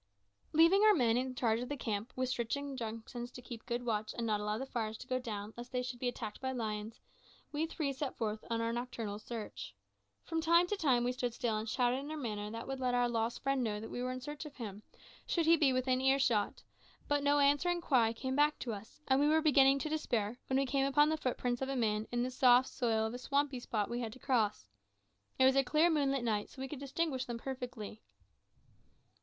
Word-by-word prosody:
Leaving 335 +6 +6
our 430 -1 +7
men 235 -7 +3
in 255 +1 -1
charge 225 -2 +1
of 245 - -5
the 290 - -3
camp, 215 -2 -3
with 255 0 0
strict 235 -1 -1
injunctions 240 -3 -5
to 250 - -11
keep 240 -2 -9
good 240 0 -2
watch 215 -2 -1
and 235 - -1
not 215 -2 +1
allow 210 +1 -1
the 265 - -4
fires 220 -4 -3
to - - -10
go 255 0 -1
down, 215 -3 -5
lest 240 +1 -9
they 250 -1 -1
should 245 -1 -5
be 250 - -1
attacked 225 -3 -5
by 260 0 -1
lions, 220 -3 -4 0.5
we 310 +2 -1
three 300 -4 -2
set 270 0 -4
forth 215 -2 -2
on 230 0 0
our 230 0 0
nocturnal 235 -4 -4
search. 220 0 -7 0.5
From 325 -1 -2
time 335 +2 +5
to 415 - -1
time 265 -10 +2
we 245 - +1
stood 245 -2 -3
still 235 -3 0
and 215 +1 -3
shouted 245 +2 +2
in 285 +2 -7
a 310 - -4
manner 210 -6 -3
that 230 +1 -6
would 270 0 -4
let 250 -1 +1
our 245 0 +3
lost 230 0 -1
friend 275 -1 +1
know 210 -2 -1
that 225 - -8
we 245 - -4
were 255 0 -1
in 255 0 -5
search 295 +2 -6
of 300 -2 -10
him, 210 -4 -7 0.5
should 335 -2 +1
he 330 +1 +7
be 295 -4 +3
within 255 0 +1
earshot, 265 -6 +2 0.4
but 290 0 +2
no 285 +1 +3
answering 290 +5 +3
cry 250 -9 +3
came 260 +3 -3
back 295 +1 +3
to 235 - -4
us; 205 +1 -10
and 265 0 +4
we 290 - +4
were 315 +1 +4
beginning 275 -3 +5
to 290 - -3
despair, 245 -7 -1
when 265 - +1
we 275 - +2
came 275 +1 +1
upon 295 +2 +4
the 315 - +2
footprints 250 -4 -2
of 265 - -1
a 275 - -1
man 215 -3 0
in 240 0 0
the 255 - -2
soft 250 0 +5
soil 225 -3 0
of 220 - -3
a 245 - -5
swampy 280 0 0
spot 215 -4 -1
we 240 +1 -3
had 230 -3 -3
to - - -12
cross. 220 - 0 0.7
It 260 - +5
was 265 0 +5
a 275 - +5
clear 310 +6 +3
moonlight 275 -4 +1
night, 215 -3 0
so - - -16
that 265 - -8
we 265 - -3
could 295 - -6
distinguish 280 -1 -2
them 240 -1 -4
perfectly. 240 -4 -6
250 Hz, 240 wpm, -34 LUFS, 230-275 Hz, 0.7 s, our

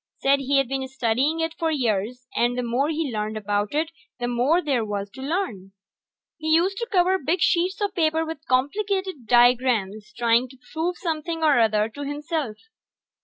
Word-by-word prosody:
Said 275 +1 +3
he'd 275 -1 +2
been 265 +1 -3
studying 265 +5 0
it 325 0 -1
for 330 - +1
years, 245 -3 -1
and 240 +1 +1
the 250 - -1
more 245 +5 0
he 315 -3 -1
learned 215 0 -2
about 205 +3 -1
it 320 +2 0 0.3
the 245 - -1
more 250 +8 +2
there 275 -9 0
was 205 -1 -4
to 265 - -10
learn. 265 - -3 0.7
He 315 - -5
used 375 +4 +2
to 470 0 -4
cover 375 -1 +3
big 330 +5 0
sheets 360 +3 +2
of 405 -1 0
paper 320 -2 +1
with 320 -2 -7
complicated 375 - -1
diagrams 240 -4 +3
trying 235 +1 +2
to 265 - -15 0.2
prove 335 +3 -1
something 325 -1 -3
or 295 -5 +5
other 215 -2 +3
to 285 +6 -9
himself. 290 -4 -3
275 Hz, 175 wpm, -24 LUFS, 235-325 Hz, 0.7 s, or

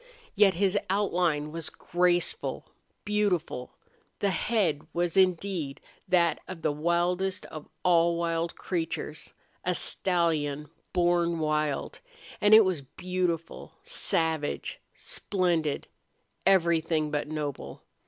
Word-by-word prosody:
Yet 195 -4 +5
his 200 +2 +2
outline 175 -6 +1
was 165 0 -5
graceful, 175 - 0 0.4
beautiful. 200 -11 -1 0.4
The 200 - +1
head 185 -6 +1
was 175 0 0
indeed 185 -5 +1 0.3
that 170 -2 +3
of 170 -3 -8
the 155 - +2
wildest 175 +5 0
of 155 -1 -9 0.2
all 170 -1 +4
wild 165 0 -1
creatures 165 -3 -4 0.3
a 180 0 0
stallion 155 -6 0 0.2
born 175 -1 +2
wild 150 -2 -1 0.4
and 205 +1 +7
it 220 -1 +8
was 180 -6 0
beautiful, 175 +3 -3
savage, 160 -2 -1 0.2
splendid, 170 -6 -1 0.6
everything 165 -4 +3
but 150 0 -1
noble. 145 - -5
170 Hz, 105 wpm, -28 LUFS, 155-185 Hz, 0.6 s, it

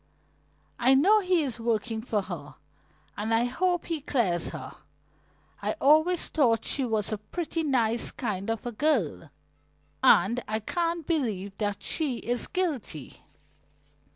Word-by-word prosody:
"I 260 +2 +5
know 395 +11 +5
he 365 -4 +2
is 250 -4 -4
working 225 0 -1
for 215 -3 -1
her 150 -7 -7 0.6
and 215 +2 -3
I 225 +1 +3
hope 350 +7 0
he 330 -3 -3
clears 195 - 0
her. - - -7 0.9
I - - -1
always 315 +5 +3
thought 240 -7 +2
she 275 - 0
was 220 -3 -1
a 215 - -2
pretty 330 - -3
nice 240 -6 +1
kind 210 -7 -4
of 225 +1 -2
a 240 - -2
girl, 225 - 0 0.7
and 230 +7 +5
I 215 +1 -1
can't 335 - -2
believe 215 - -1
that 205 -2 -2
she 290 -7 0
is 245 +1 -2
guilty." 295 - -3
240 Hz, 140 wpm, -27 LUFS, 215-310 Hz, 0.9 s, I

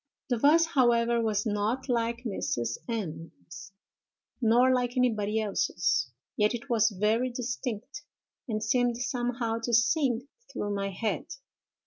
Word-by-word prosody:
"'The 245 - +1
voice, 315 +6 +5
however, 235 -3 +3
was 215 -1 0
not 215 +5 -1
like 235 -1 -1
Mrs. 120 - -2
M——'s, 170 -3 -6 0.7
nor 245 +3 +5
like 250 0 0
anybody 220 -4 +1
else's, 180 - 0 0.3
yet 210 +2 +2
it 240 +3 -8
was 225 -1 +4
very 225 +5 +2
distinct, 250 +2 -5 0.5
and 215 -2 -2
seemed 245 -1 +1
somehow 240 -2 -2
to 235 +1 -3
sing 255 0 +2 0.2
through 205 - -3
my 195 0 -2
head. 215 - -3
235 Hz, 125 wpm, -28 LUFS, 210-250 Hz, 0.7 s, voice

